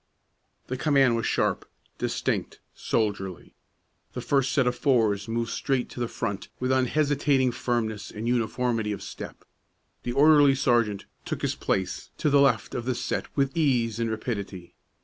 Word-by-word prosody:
The 130 - -4
command 135 -4 +3
was 115 - -1
sharp, - - 0 0.3
distinct, - - -2
soldierly. 100 -5 -2 0.6
The - - -4
first 135 -2 +1
set 140 -4 +2
of 125 0 +1
fours 115 -6 +2
moved 115 0 -2
straight 130 +1 -1
to - - -9
the 120 - 0
front 100 -4 -4
with 125 +1 0
unhesitating 135 0 +2
firmness 115 -4 -2
and 110 +2 -5
uniformity 120 -2 0
of 100 - -7
step; - - -9 0.6
the 120 - -3
orderly 145 0 +6
sergeant 120 -6 +1 0.2
took - - -5
his - - +1
place 95 -1 -2
to 150 - +1
the 140 0 +6
left 125 -6 +2
of 120 - -3
the 130 -1 0
set - - -2
with 135 -1 +1
ease 125 -8 +1
and 115 -1 0
rapidity. 100 -5 -5
120 Hz, 155 wpm, -26 LUFS, 110-135 Hz, 0.6 s, orderly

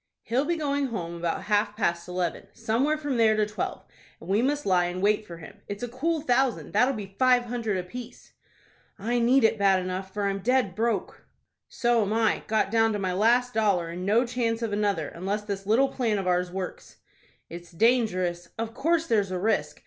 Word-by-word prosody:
"He'll 255 +5 0
be 345 - 0
going 285 -3 -1
home 175 -8 -5
about 170 -1 -3
half 210 0 0
past 170 -5 -1
eleven, 180 +1 -3
somewhere 235 +7 0
from 290 -4 -2
there 220 -1 +4
to 215 0 +2
twelve, 210 0 -5 0.3
and 165 - -12
we 200 +4 +2
must 290 +3 0
lie 180 -2 +3
in 175 +1 -4
wait 210 +2 +1
for 170 - -9
him. 195 +5 -13
It's 205 +3 -6
a - - -1
cool 305 +7 -1
thousand, 260 -2 +1
that'll 265 +2 +3
be 195 -2 -8
five 255 -1 +4
hundred 230 -4 -2
apiece." 235 +7 -8 0.6
"I 235 +4 -1
need 245 +2 +4
it 225 -1 +3
bad 195 -1 +4
enough, 185 +1 -4
for 205 +1 -3
I'm 195 0 0
dead 245 -2 +1
broke." 220 0 -2 0.4
"So 240 -1 +1
am 205 0 -1
I. 225 -1 +2
Got 215 -2 +1
down 225 -1 +3
to - - -1
my 190 -2 -2
last 240 +5 +2
dollar, 200 -6 +1
and 175 +2 -6
no 220 +6 +3
chance 235 -1 -1
of 220 -3 -2
another, 200 -7 0
unless 195 +5 -3
this 200 -2 -5
little 255 +6 +3
plan 230 -5 0
of 195 - -3
ours 180 0 +1
works." 185 0 -7 0.5
"It's 170 +1 -10
dangerous." 185 -4 +1
"Of 225 0 -4
course 330 +5 +1
there's 210 - +1
a 185 - -2
risk. 215 +5 -1
215 Hz, 200 wpm, -26 LUFS, 190-245 Hz, 0.6 s, there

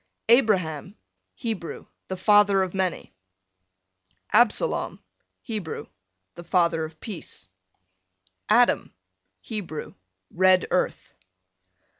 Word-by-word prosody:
Abraham, 195 - +2 0.4
Hebrew, 220 -8 -5 0.2
the 190 - -4
father 205 0 +5
of 185 - -4
many. 190 -2 -2 1.2
Absalom, 240 - +2 0.4
Hebrew, 200 - -5 0.5
the 175 - -10
father 170 -2 +2
of 155 0 -12
peace. 195 - -7 1.0
Adam, 240 +3 +3 0.5
Hebrew, 200 -9 -6 0.4
red 185 0 +4
earth. - - -1
190 Hz, 80 wpm, -25 LUFS, 170-215 Hz, 1.2 s, father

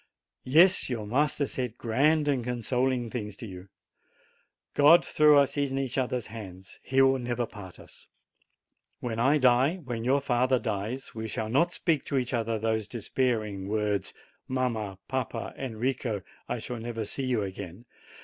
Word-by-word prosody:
Yes, 175 +5 +5
your 115 -4 -3
master 140 +6 +1
said 125 -4 -4
grand 145 +6 +2
and 135 -4 +1
consoling 125 0 -1
things 105 -4 -5
to - - -8
you. 95 -2 -10 1.0
God 150 +4 +6
threw 150 -1 +5
us 140 0 +3
in 140 -2 0
each 135 -2 -2
other's 125 -4 -1
arms; 95 -4 -10
he 135 0 +3
will 135 0 +4
never 120 -1 -2
part 100 -5 -11
us. - - -15 0.9
When 115 -2 -3
I 135 +6 +4
die, 130 +4 +4
when 125 -10 -5
your 135 +4 +3
father 130 -1 +2
dies, 115 +3 -4
we 110 0 -5
shall 110 0 -3
not 170 +9 +3
speak 165 -5 0
to 140 - -1
each 125 -1 -1
other 115 -1 0
those 110 -1 -1
despairing 110 -4 -2
words, 105 -2 -1 0.4
"Mamma, 115 -7 -2
papa, 130 -3 -3
Enrico, 120 -4 -2 0.3
I - - -1
shall 125 - -6
never 115 -1 -4
see 130 +5 -3
you 120 -5 +1
again 95 +2 -7
120 Hz, 160 wpm, -28 LUFS, 110-135 Hz, 1.0 s, God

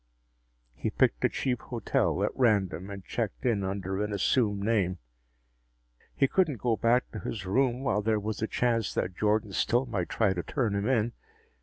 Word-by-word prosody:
He - - -3
picked - - +1
a - - +4
cheap 125 -3 -1
hotel 120 -4 0
at - - +1
random 100 -6 +1
and 100 -2 -8
checked 115 0 -3
in 110 -5 +2
under 95 +1 -2
an 105 - -3
assumed 105 0 +1
name. 100 -4 +1 1.2
He 135 - +3
couldn't 160 -4 +1
go 115 +1 +1
back 120 +3 +2
to - - -6
his 100 -4 -5
room 125 +5 +1
while 105 -6 +1
there 110 0 +1
was 105 0 -4
a 110 - 0
chance 115 -3 0
that 90 - -1
Jordan 105 0 +1
still 120 +6 +2
might 100 -8 -3
try 105 -4 +2
to 90 - -2
turn 115 - -1
him 100 +2 -1
in. 120 -2 +1
110 Hz, 180 wpm, -29 LUFS, 100-120 Hz, 1.2 s, a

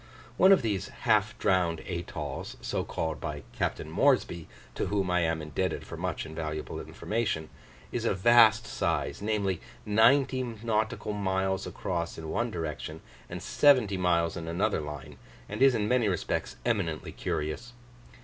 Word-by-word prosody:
One 190 +8 +6
of 195 - +6
these 105 -5 -1 0.2
"half 105 -2 +3
drowned 90 -4 +1
atolls," 80 -5 -5
so - - -2
called 80 0 -3
by 75 -4 -4
Capt. - - -2
Moresby 85 -2 +1 0.3
(to - - -2
whom 100 -2 0
I 90 - +3
am 80 -2 0
indebted 75 +5 -2
for - - -7
much - - -3
invaluable 80 -1 -5
information), 105 -8 -2 0.4
is 120 - -2
of 105 -5 +1
vast 110 +1 +6
size, - - -1
namely, 100 -4 0 0.2
ninety 130 +5 +4
nautical 110 -3 -2
miles 95 -1 -1
across 85 -2 -3
in 80 -1 -6
one 120 +1 0
direction, 80 -3 -5 0.3
and - - -6
seventy 130 -9 +4
miles 85 -3 +1
in 80 -1 -5
another 90 +2 0
line; 75 -1 -8 0.3
and 105 +4 -6
is 135 -2 +6
in 105 -2 0
many 125 -1 +3
respects 95 - -2
eminently 95 -10 -1
curious. 75 +11 -3
95 Hz, 150 wpm, -29 LUFS, 80-110 Hz, 0.4 s, One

